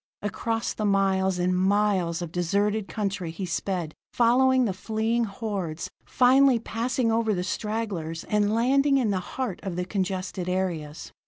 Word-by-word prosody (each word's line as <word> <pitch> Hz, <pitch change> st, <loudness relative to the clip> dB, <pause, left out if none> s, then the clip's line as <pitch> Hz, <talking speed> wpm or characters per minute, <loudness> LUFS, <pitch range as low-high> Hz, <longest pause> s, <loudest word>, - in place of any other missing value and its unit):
Across 225 Hz, +2 st, -2 dB
the 215 Hz, -, -3 dB
miles 190 Hz, -2 st, +2 dB
and 180 Hz, +1 st, +1 dB
miles 190 Hz, -3 st, +1 dB
of 165 Hz, -, -6 dB
deserted 200 Hz, +4 st, 0 dB
country 200 Hz, -5 st, -3 dB
he 170 Hz, +4 st, -5 dB
sped, 175 Hz, -2 st, -3 dB, 0.2 s
following 255 Hz, +2 st, +4 dB
the 200 Hz, -, -1 dB
fleeing 220 Hz, +4 st, -1 dB
hordes, 195 Hz, -6 st, -4 dB, 0.2 s
finally 260 Hz, +1 st, +5 dB
passing 230 Hz, +1 st, -1 dB
over 225 Hz, -2 st, +1 dB
the 180 Hz, -, -2 dB
stragglers 200 Hz, -6 st, -3 dB
and 210 Hz, -1 st, +1 dB
landing 275 Hz, +4 st, +3 dB
in 235 Hz, -6 st, +1 dB
the 190 Hz, -, 0 dB
heart 215 Hz, +1 st, -4 dB
of 190 Hz, -3 st, -4 dB
the 180 Hz, 0 st, -2 dB
congested 185 Hz, -2 st, -3 dB
areas. 170 Hz, -5 st, -3 dB
200 Hz, 150 wpm, -26 LUFS, 180-225 Hz, 0.2 s, finally